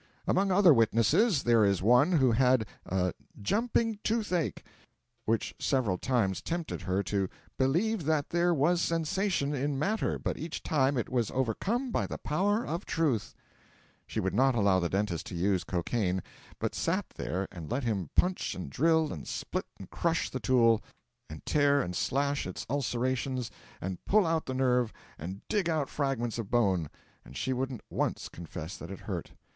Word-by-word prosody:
Among 195 0 +2
other 185 -3 +7
witnesses, 115 - +3
there 115 -2 +4
is 100 -3 +2
one 125 - +5
who 130 -7 +4
had 125 0 +3 0.2
a 90 -1 0 0.3
'jumping 225 - 0
toothache,' 210 -7 0 0.6
which 115 0 0
several 115 -9 +1
times 115 -8 0
tempted 170 -1 -3
her 95 +2 0
to 100 -2 -1 0.3
'believe 170 +8 +1
that 155 -2 0
there 175 +1 +3
was 170 +3 +2
sensation 165 -2 0
in 140 0 -1
matter, 210 +10 0
but - - -3
each 160 +1 -5
time 140 -2 +2
it 120 - -1
was 120 -4 0
overcome 195 - -1
by - - 0
the - - -5
power 205 +9 0
of 170 +5 -3
Truth.' 145 -10 0 0.7
She - - -3
would 95 -2 -1
not 130 +4 +3
allow 100 -4 +4
the 85 -1 0
dentist 95 -4 -1
to - - -6
use 95 +1 +1
cocaine, 90 +1 -1 0.3
but - - -2
sat - - 0
there 95 +3 -3
and 85 -5 -8
let 135 +2 -1
him 100 -9 -1
punch 180 0 +1
and 90 -7 -6
drill 160 - +2
and 75 - -8
split - - -3
and 95 - -10
crush 165 -1 0
the 130 - -3
tooth, 115 -1 +4 0.5
and 80 0 -9
tear 145 -1 +3
and 90 -9 -2
slash 140 +3 0
its 90 - -6
ulcerations, 130 -1 -1 0.3
and 95 0 -5
pull 210 -1 +4
out 165 -1 0
the 130 - -3
nerve, 125 -3 +2 0.3
and 95 +5 -7
dig 200 -5 +1
out 155 -4 0
fragments 125 -5 -1
of 110 -4 -4
bone; 95 -10 +2 0.3
and 65 - -11
she 130 - -1
wouldn't 130 -2 -3
once - - -1
confess 85 +1 -7
that 85 - -9
it 95 - -8
hurt. - - -5
130 Hz, 170 wpm, -30 LUFS, 100-160 Hz, 0.7 s, other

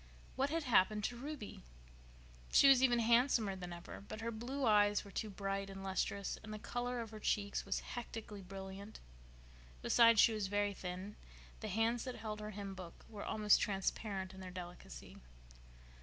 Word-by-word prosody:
What 270 +2 +1
had 325 +1 -1
happened 210 -4 +3
to 240 - -1
Ruby? 270 -3 -7 0.9
She - - +7
was 270 -2 +8
even 245 -2 +5
handsomer 235 -3 +3
than 180 -1 -7
ever; 175 +2 -8
but 205 +2 -8
her 230 +1 -2
blue 250 +5 -3
eyes 205 -2 +4
were 200 - -11
too 215 - -3
bright 195 0 -3
and 195 0 -7
lustrous, 195 +1 -2
and 220 - -9
the 215 - -4
color 245 +2 -3
of 225 -1 -7
her 215 - -8
cheeks 205 -1 0
was - - 0
hectically 225 -4 -6
brilliant; 195 +2 -8 0.8
besides, 230 -2 +6
she 225 - +7
was 210 -2 -1
very 205 +1 +1
thin; 185 +2 -6 0.4
the 220 - -5
hands 225 +3 +1
that 255 - -4
held 215 -1 -5
her 210 0 -5
hymn 200 -1 -6
book 180 -3 -10
were 210 -2 -7
almost 210 -1 +4
transparent 195 -1 -2
in 190 - -11
their 185 -1 -7
delicacy. 180 -1 -9
210 Hz, 175 wpm, -37 LUFS, 195-230 Hz, 0.9 s, was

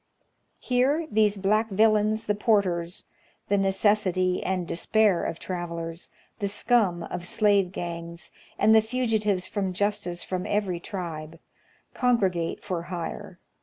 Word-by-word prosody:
Here 265 +6 +1
these 210 -1 +3
black 215 +3 +1
villains 215 +1 +2
the 210 - +1
porters 190 -5 0 0.2
— - - -38
the 200 - +3
necessity 190 -2 +2
and 185 -2 -2
despair 195 +1 +2
of 165 - -3
travelers, 170 -2 -5 0.3
the 200 - -1
scum 205 -4 +1
of 175 0 -5
slave 200 -4 +2
gangs, 170 -1 -6 0.3
and 215 +1 +5
the 220 - +7
fugitives 220 -5 0
from 195 -3 -2
justice 200 -3 -1
from 185 -1 -3
every 200 -4 -1
tribe 165 -4 -6 0.3
— - - -36
congregate 195 -10 0
for 180 -4 -3
hire. 185 +2 -6
195 Hz, 130 wpm, -26 LUFS, 175-215 Hz, 0.3 s, the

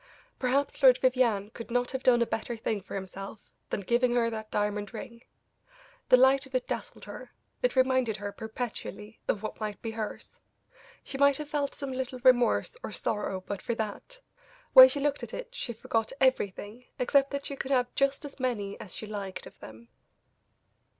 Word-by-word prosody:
Perhaps 275 +4 0
Lord 255 -2 +8
Vivianne 235 -6 +2
could 230 0 -9
not 245 +1 0
have 265 0 -3
done 240 -2 +5
a - - -1
better 230 +1 -3
thing 220 -2 -2
for 190 - -8
himself 195 +2 -6 0.3
than - - -2
giving 240 +4 +2
her 230 -1 +2
that 220 -1 -6
diamond 205 -1 -2
ring; 235 -3 -8 0.9
the 255 - +8
light 265 +2 +5
of 265 - -9
it 255 - +1
dazzled - - -5
her; - - -9 0.3
it - - +1
reminded 255 -4 +2
her, 205 0 -5
perpetually, 220 -1 -6
of 210 - 0
what 215 - -5
might 210 -2 -4
be 225 - -3
hers; 220 -1 -6 0.6
she 270 - -6
might 280 -1 +5
have 300 -1 -6
felt 285 -2 -1
some 275 -2 -4
little 255 0 -3
remorse 240 - +4
or - - -6
sorrow 200 -3 -2
but 200 -2 -4
for 235 - -2
that; 220 - -5 0.5
when - - +12
she 285 - 0
looked 290 0 0
at - - -6
it - - -6
she 275 - -4
forgot 225 0 -1
everything 240 -2 0
except 275 +2 +3
that 280 0 -4
she 280 - -4
could 270 - -5
have 250 -2 +1
just 275 +2 +1
as 285 -1 -10
many 215 -6 -2
as 185 - -8
she - - -5
liked 200 -3 -6
of - - -14
them. 110 +1 -12
240 Hz, 190 wpm, -29 LUFS, 210-265 Hz, 0.9 s, when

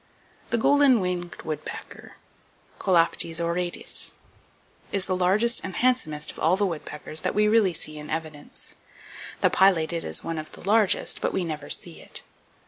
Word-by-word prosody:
The 235 - +1
Golden 280 0 +5
Winged 180 -2 -3
Woodpecker, 155 -1 -7 0.7
(Colaptes 170 -2 +2
auratus), 175 +1 -2 0.8
is 195 -2 +1
the 185 - 0
largest 200 +6 +3
and 190 -1 -6
handsomest 235 -13 +1
of - - -13
all 170 +4 +3
the 205 - +2
woodpeckers 155 -3 -6
that - - -2
we 210 0 +4
really 210 -3 +4
see 155 0 -1
in 150 - -9
evidence. 155 -2 -6 0.7
The - - +4
Pileated 170 -3 +3
is - - +1
one 165 -1 -3
of 155 - -9
the - - -10
largest, 210 +1 +2
but - - -1
we 185 - 0
never 150 -3 -5
see 170 -2 +1
it. - - -4
175 Hz, 155 wpm, -25 LUFS, 160-200 Hz, 0.8 s, Golden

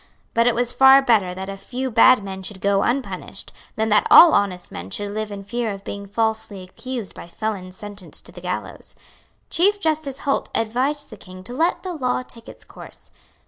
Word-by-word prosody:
But 230 +1 +3
it 245 - +3
was 245 +1 0
far 265 +2 +7
better 205 -8 +2
that 190 +1 -6
a 195 - -5
few 255 +6 -5
bad 230 0 +6
men 190 -1 -6
should 190 +1 -7
go 200 0 +2
unpunished 260 +2 -3 0.2
than 220 0 0
that 210 0 +3
all 340 - +9
honest 185 -3 0
men 90 +2 -7
should 205 - -4
live 215 0 -4
in 200 -1 -7
fear 230 +2 -2
of 195 0 -8
being 200 0 -7
falsely 220 -2 -2
accused 235 +3 -6
by - - -10
felons 185 -1 -5
sentenced 205 -2 -5
to - - -12
the - - -12
gallows. - - -6 0.6
Chief 405 +4 +3
Justice 310 -6 -1
Holt 275 - -1
advised 260 +7 -1
the - - -10
King 185 0 -12
to 240 - -7
let 325 +7 0
the 370 -2 -4
law 255 -5 -1
take 230 -2 -13
its - - -14
course. - - -14
220 Hz, 200 wpm, -22 LUFS, 195-255 Hz, 0.6 s, all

